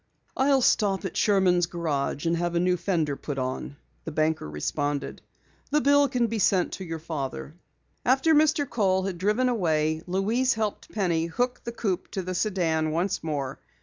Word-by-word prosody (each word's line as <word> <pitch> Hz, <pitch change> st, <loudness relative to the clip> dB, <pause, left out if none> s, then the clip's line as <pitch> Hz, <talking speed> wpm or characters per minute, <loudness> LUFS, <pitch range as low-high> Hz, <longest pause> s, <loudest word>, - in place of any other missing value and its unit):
"I'll 270 Hz, -1 st, +3 dB
stop 200 Hz, -4 st, +2 dB
at 190 Hz, -, -4 dB
Sherman's 185 Hz, -4 st, +3 dB
Garage 155 Hz, -4 st, -2 dB
and 165 Hz, 0 st, +2 dB
have 175 Hz, 0 st, -1 dB
a -, -, +3 dB
new 180 Hz, +1 st, +2 dB
fender 165 Hz, -5 st, -1 dB
put 140 Hz, 0 st, -6 dB
on," 130 Hz, +2 st, -3 dB, 0.3 s
the 160 Hz, -, -5 dB
banker 155 Hz, -, 0 dB
responded. 145 Hz, -, -3 dB, 0.5 s
"The 300 Hz, -, +3 dB
bill 285 Hz, -1 st, +4 dB
can 245 Hz, -2 st, +1 dB
be 225 Hz, -1 st, -2 dB
sent 190 Hz, -2 st, +2 dB
to 190 Hz, -, -6 dB
your 165 Hz, -2 st, -5 dB
father." 150 Hz, -3 st, -5 dB, 0.5 s
After 270 Hz, +6 st, +3 dB
Mr. 305 Hz, -1 st, +3 dB
Kohl 190 Hz, -5 st, +1 dB
had 185 Hz, -3 st, -4 dB
driven 210 Hz, +7 st, +2 dB
away, 160 Hz, -8 st, +1 dB
Louise 220 Hz, +8 st, +1 dB
helped 215 Hz, -2 st, -3 dB
Penny 170 Hz, -6 st, 0 dB
hook 245 Hz, +9 st, -1 dB
the 235 Hz, -, -3 dB
coupe 205 Hz, -6 st, -2 dB
to 190 Hz, -, -2 dB
the 185 Hz, +1 st, -4 dB
sedan 175 Hz, -5 st, 0 dB
once 175 Hz, +4 st, -1 dB
more. 140 Hz, -4 st, -3 dB
180 Hz, 175 wpm, -26 LUFS, 160-225 Hz, 0.5 s, bill